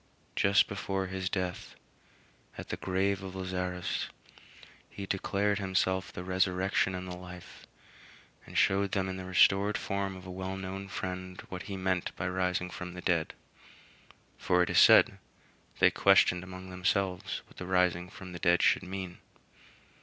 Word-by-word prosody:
Then, - - -1
just 100 0 +5
before 95 -1 -2
his 95 0 -3
death, 90 -2 -3 0.8
at - - -8
the - - -2
grave 95 +1 0
of 95 -1 -7
Lazarus, 90 -1 -3 0.8
he 100 - -7
declared 100 +1 0
himself 95 0 0
the 90 - -7
Resurrection 95 +1 +1
and 90 0 -5
the 90 - -5
Life, 90 -1 -11 0.8
and - - -6
showed 100 +1 +3
them 95 -1 +1
in 95 0 -4
the 95 - -6
restored 95 +2 +4
form 100 -1 -2
of 95 0 -11
a 95 - -7
well 95 +1 -4
known 95 +1 -5
friend 90 -1 -5
what 90 -1 -5
he 100 - -4
meant 95 -1 -1
by 90 - -3
rising 90 0 -1
from 90 +1 -7
the 90 - -7
dead 85 -4 0 1.0
for 90 0 +3
it - - -2
is - - +5
said, - - +7 0.6
"They - - +5
questioned 90 0 +4
among 95 0 -9
themselves 90 0 -1
what - - -21
the 90 - -6
rising 90 -1 +2
from 95 -2 -10
the 85 - -7
dead 85 +1 +3
should - - +4
mean." 95 -1 -6
95 Hz, 160 wpm, -30 LUFS, 90-95 Hz, 1.0 s, said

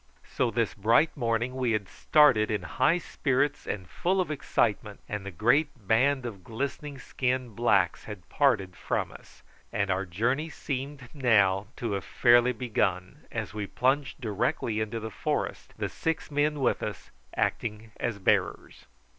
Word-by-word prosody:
So 125 - 0
this 115 -1 0
bright 115 +10 +3
morning 120 -1 0
we 125 -3 +1
had 105 -3 -1
started 140 -7 +4
in 105 -4 -1
high 150 - +2
spirits 145 -3 -1
and 95 -4 -4
full 185 - 0
of 175 -5 0
excitement, 105 -7 -1
the 100 -2 -4
great 120 - +1
band 130 +4 +3
of 100 -6 -7
glistening 140 +5 -4
skinned 125 -3 -2
blacks 100 -7 +2
had 105 -5 -9
parted 110 -11 +1
from - - -2
us, - - -16 0.3
and 100 -1 0
our 95 +1 -1
journey 120 - 0
seemed 140 -2 -5
now 100 -8 +3
to 115 -3 -3
have 100 -2 -2
fairly 120 0 +4
begun, 105 -6 -2
as - - -4
we 105 -2 -4
plunged 135 +5 0
directly 110 0 -1
into 110 +1 -2
the 110 0 -6
forest, - - -3
the - - -1
six 160 -1 -3
men 145 0 +1
with 130 - +1
us - - -6 0.2
acting 110 0 -2
as 120 -3 -2
bearers. 95 - 0
115 Hz, 155 wpm, -28 LUFS, 105-135 Hz, 0.3 s, started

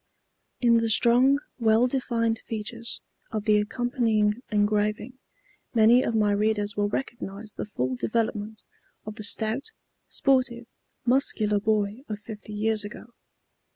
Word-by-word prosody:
In 235 -2 +5
the 230 0 +1
strong, 245 +5 +5 0.2
well 225 +1 +4
defined 235 -3 0
features 230 +2 -5 0.3
of 215 -2 -4
the 210 -1 +4
accompanying 225 -1 0
engraving 210 +4 0 0.6
many 230 +2 +6
of 230 - -1
my 210 -2 +3
readers 205 0 0
will 205 0 0
recognize 215 -3 -5
the - - -6
full 130 -9 -2
development 215 - -2 0.4
of 215 - -6
the 215 - -8
stout, 220 - +1 0.4
sportive, 255 -3 +1 0.4
muscular 230 -5 +2
boy 210 +2 0
of 210 - -3
fifty 210 0 -10
years 215 0 0
ago. 220 +3 -10
220 Hz, 125 wpm, -26 LUFS, 210-235 Hz, 0.6 s, many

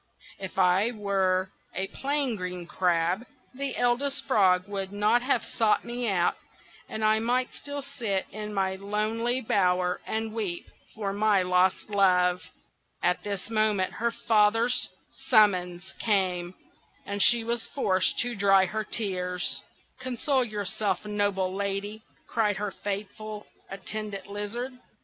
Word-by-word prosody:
If 190 -2 -7
I 190 +4 +4
were 195 -4 0 0.2
a 190 - -1
plain 280 -3 -1
green 180 -2 -5
crab 175 +4 +1 0.3
the 275 +1 -3
Eldest 245 +3 +1
Frog 190 -6 +3
would 195 -1 -4
not 210 +4 +3
have 260 +3 +1
sought 220 -2 +1
me 240 0 -2
out, 175 -3 +2 0.6
and 220 0 -2
I 215 0 +4
might 250 +3 0
still 285 -1 -6
sit 230 -9 -2
in 210 0 -5
my 190 -2 0
lonely 220 +5 -1
bower 180 -6 +1
and 220 0 -2
weep 200 -6 -3 0.3
for 200 -2 -2
my 205 -2 +3
lost 180 +3 +2
love." 180 -3 +3 0.6
At 180 - +2
this 205 +1 -5
moment 215 -4 +2
her 235 +2 0
father's 225 +2 +2 0.4
summons 190 -5 +3
came, 185 -4 0 0.5
and 200 0 -2
she 235 +1 +6
was 235 0 -2
forced 190 -9 +1
to 245 0 -1
dry 195 -2 +5
her 215 +4 -2
tears. 180 -5 -1 0.4
"Console 260 +2 0
yourself, 210 -1 -2
noble 205 -3 0
Lady!" 200 +2 -3 0.2
cried 210 -3 0
her 205 0 -2
faithful 205 +2 -5 0.2
Attendant 200 0 -6
Lizard. 210 +6 -4
205 Hz, 130 wpm, -27 LUFS, 190-225 Hz, 0.6 s, she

